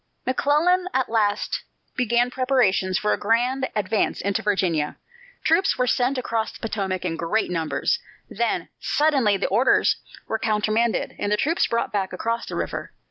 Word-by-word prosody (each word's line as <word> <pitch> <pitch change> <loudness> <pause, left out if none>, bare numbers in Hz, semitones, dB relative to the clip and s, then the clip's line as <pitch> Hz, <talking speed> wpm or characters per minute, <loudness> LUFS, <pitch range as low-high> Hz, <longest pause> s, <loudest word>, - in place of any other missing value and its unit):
McClellan 310 +8 +2
at 260 -1 +1
last 210 -3 0 0.3
began 245 0 +2
preparations 250 -8 +2
for 210 - +1
a - - -2
grand 245 +5 +1
advance 210 +1 0
into 200 0 -1
Virginia, 180 -7 0 0.5
troops 340 +5 +3
were 250 - +2
sent 250 +2 +1
across 225 -3 -1
the - - -13
Potomac 195 -5 -3
in 165 -2 -1
great 170 +5 -1
numbers 160 -5 0 0.3
then, 235 +2 -2
suddenly, 275 -9 +2
the 195 - -1
orders 235 +7 +3 0.3
were 220 - -1
countermanded 220 +2 0
and 205 - -1
the 210 - +3
troops 325 +9 +1
brought 235 -1 -1
back 195 -2 -1
across 230 +5 -2
the - - -5
river. - - -4
225 Hz, 155 wpm, -23 LUFS, 200-255 Hz, 0.5 s, troops